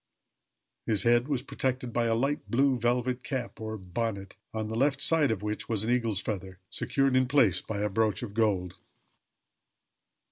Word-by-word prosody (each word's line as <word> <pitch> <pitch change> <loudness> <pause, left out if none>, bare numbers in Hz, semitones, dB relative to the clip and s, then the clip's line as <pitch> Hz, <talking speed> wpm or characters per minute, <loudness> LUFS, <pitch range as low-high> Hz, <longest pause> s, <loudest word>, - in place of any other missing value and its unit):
His 105 -4 +2
head 120 +2 +4
was 135 -4 -1
protected 130 -3 -2
by 120 -1 +1
a 115 - +2
light 140 +5 -1
blue 135 +1 +3
velvet 125 +1 0
cap, 130 -5 -4
or 110 0 -4
bonnet, 100 +1 -4 0.2
on 110 -1 -3
the 110 - -4
left 135 +3 +2
side 155 -3 +3
of 105 -3 -2
which 105 0 -3
was 110 -3 +2
an 115 - 0
eagle's 115 -5 +1
feather, 95 -3 -5
secured 135 -2 +1
in 130 0 +3
place 125 - +3
by 100 -2 -4
a 105 - +1
brooch 110 +3 0
of 105 -4 -6
gold. 100 -5 0
115 Hz, 175 wpm, -29 LUFS, 105-130 Hz, 0.2 s, head